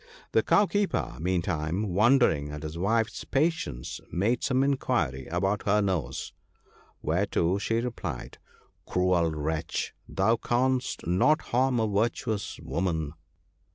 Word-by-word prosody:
The - - +4
Cowkeeper, 205 - +1
meantime, 90 +2 -1
wondering 105 - +4
at 75 +1 -7
his 75 +1 -5
wife's 110 +5 0
pa 135 - 0
tience, 60 - -6
made 110 +8 +1
some 130 0 +2
inquiry 120 - 0
about 95 +5 -1
her 105 +1 +4
nose; 90 -11 -2 0.7
whereto 90 +1 +1
she 115 - -1
replied, 105 - -5 0.2
' - - -38
Cruel 90 -2 +2
wretch! 80 +1 -2 0.2
thou 110 +5 +2
canst 125 +2 0
not 95 - +3
harm 125 0 +3
a 110 - +2
virtuous 105 0 -1
woman. 80 0 -2
95 Hz, 120 wpm, -28 LUFS, 80-120 Hz, 0.7 s, The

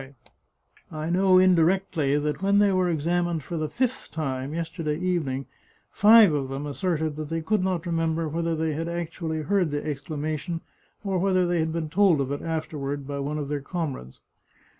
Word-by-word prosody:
I 155 +1 -3
know 185 +1 +4
indirectly 180 -4 +3
that 150 +3 -2
when 200 +1 +3
they 205 -1 +5
were 185 -1 +2
examined 170 0 0
for 175 - -6
the 155 -2 -2
fifth 255 - -2
time, 135 -3 -3
yesterday 160 -1 -3
evening, 160 -7 -1 0.5
five 215 -4 +7
of 140 -3 -1
them 135 +2 -4
asserted 155 +1 -1
that 155 -1 -5
they 165 0 -2
could 210 +3 +1
not 185 -2 -1
remember 165 -1 0
whether 165 +2 -1
they 160 0 -1
had 165 +3 -3
actually 165 -2 -3
heard 190 0 +1
the 145 0 -3
exclamation, 155 +3 -3 0.4
or 195 -3 0
whether 185 -1 +2
they 175 -1 +1
had 160 0 0
been 160 -2 -3
told 185 -4 +4
of 135 0 -1
it 145 - -3
afterward, 150 -3 -3
by 140 0 -4
one 145 +2 -2
of 145 -2 -3
their 145 -1 -2
comrades. 140 - -5
160 Hz, 180 wpm, -25 LUFS, 150-180 Hz, 0.5 s, five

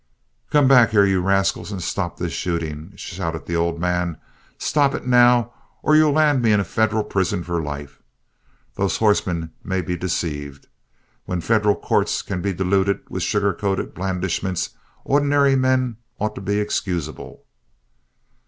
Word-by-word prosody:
"Come 145 -2 +4
back 125 -4 +6
here, 105 -2 +4
you 95 -2 +2
rascals, 95 +2 0
and 100 - -4
stop 90 -1 -3
this 85 -2 -3
shooting!" 80 0 -4
shouted 85 -4 -5
the 85 - -3
old 85 0 0
man. 90 -1 -1 0.4
"Stop 145 -2 +1
it, - - -6
now, 120 -1 +4 0.3
or 155 - +4
you'll 155 -1 +5
land 150 -3 +3
me 115 -2 +3
in 105 - +4
a - - +1
federal 110 +1 0
prison 95 -3 -1
for 85 -1 -2
life! 75 -1 -7 0.7
Those 100 -1 -1
horsemen 90 -6 +1
may 95 0 -1
be 90 +1 -3
deceived. 75 -5 -4 0.6
When 90 - -2
federal 105 +2 +2
courts - - 0
can 95 -2 -4
be 100 - -1
deluded 95 +2 +1
with 95 - -3
sugar 100 +2 +1
coated 95 +1 -2
blandishments, 95 0 -2 0.3
ordinary 140 -1 +3
men 130 -3 +1 0.2
ought 110 +1 -2
to - - -8
be 100 +2 0
excusable." 90 -6 -4
95 Hz, 155 wpm, -21 LUFS, 85-110 Hz, 0.7 s, back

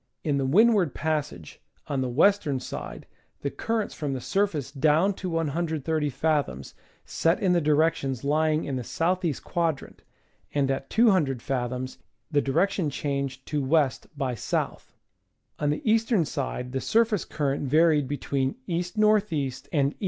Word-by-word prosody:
In 145 -3 +1
the 135 - 0
Windward 200 - +4
Passage, 150 - -3 0.2
on 140 -2 -2
the 130 - -1
western 155 0 +3
side 125 - -7 0.4
the 140 - -2
currents 225 -2 -2
from 145 -3 -3
the 130 - -3
surface 155 -3 -1
down 155 +7 +3
to 185 -1 -5
130 160 -1 -1
fathoms 140 - -1 0.3
set 165 +1 +1
in 185 -3 +2
the 175 - +3
directions 150 -4 +1
lying 155 +2 +2
in 135 -2 -2
the - - -2
S. 120 - -8 0.2
E. 165 -4 +1
quadrant, 165 -5 -2 0.5
and 135 -2 +2
at 135 0 -3
200 185 - +3
fathoms 130 0 -3 0.3
the 145 -2 +3
direction 170 +4 +1
changed 140 -2 -3
to 150 -1 -1
W. 140 +1 +3 0.3
by 135 -3 -1
S. 120 - -7 1.1
On 150 - +1
the 150 +9 -2
eastern 225 -4 +3
side 125 -3 -4
the 135 0 -2
surface 225 -4 +2
current 140 -2 -2
varied 155 -1 +4
be 145 +2 -2
tween 135 +2 -1
E. 175 -1 -1
N. 215 0 +5
E. 140 -5 -1 0.2
and 140 -1 +2
E. - - -31
150 Hz, 160 wpm, -26 LUFS, 135-170 Hz, 1.1 s, N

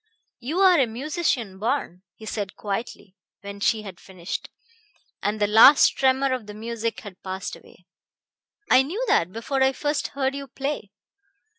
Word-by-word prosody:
"You 280 +8 -4
are 370 -4 +6
a 260 - +3
musician 240 - -2
born," 220 -6 -2
he 220 - -12
said 205 -2 -4
quietly 200 -2 -5 0.3
when 200 0 -8
she 215 +1 +1
had 190 -3 -10
finished, 185 -2 -7 0.7
and 210 +1 -1
the 205 - +3
last 225 +7 +7
tremor 265 0 +1
of 245 -5 -4
the 210 - -9
music 230 +1 -4
had 200 -4 -12
passed 190 0 -5
away. - - -19 0.8
"I 255 - +6
knew 370 - -3
that 170 +2 +2
before 265 +6 -3
I 265 0 +4
first 295 +2 -1
heard 265 -1 0
you 280 0 -6
play." 275 -6 -4
230 Hz, 160 wpm, -24 LUFS, 205-275 Hz, 0.8 s, last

